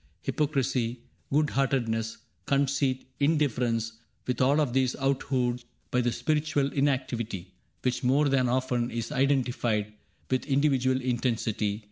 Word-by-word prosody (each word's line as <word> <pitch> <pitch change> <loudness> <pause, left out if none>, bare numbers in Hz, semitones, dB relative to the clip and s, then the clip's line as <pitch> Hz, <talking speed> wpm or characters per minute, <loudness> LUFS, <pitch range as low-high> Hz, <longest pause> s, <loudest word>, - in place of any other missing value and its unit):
Hypocrisy, 130 -5 0 0.3
good 150 +1 +2
heartedness, 115 -5 0 0.3
conceit, 135 -1 +1
Indifference, 120 -7 +1
— - - -43
with 125 -1 -1
all 140 +4 +4
of 140 -6 +1
these 130 -1 +2
out 135 0 0
hued 125 -2 0 0.3
By 125 - +2
the 120 0 +1
spiritual 150 0 0
inactivity 120 -9 -1 0.3
Which 125 0 0
more 140 +4 +3
than 130 -3 +2
often 125 -1 0
is 115 -1 -4
identified 125 -6 +1 0.4
With 130 +2 0
individual 135 -2 +2
intensity. 115 -4 -1
130 Hz, 125 wpm, -28 LUFS, 120-140 Hz, 0.4 s, all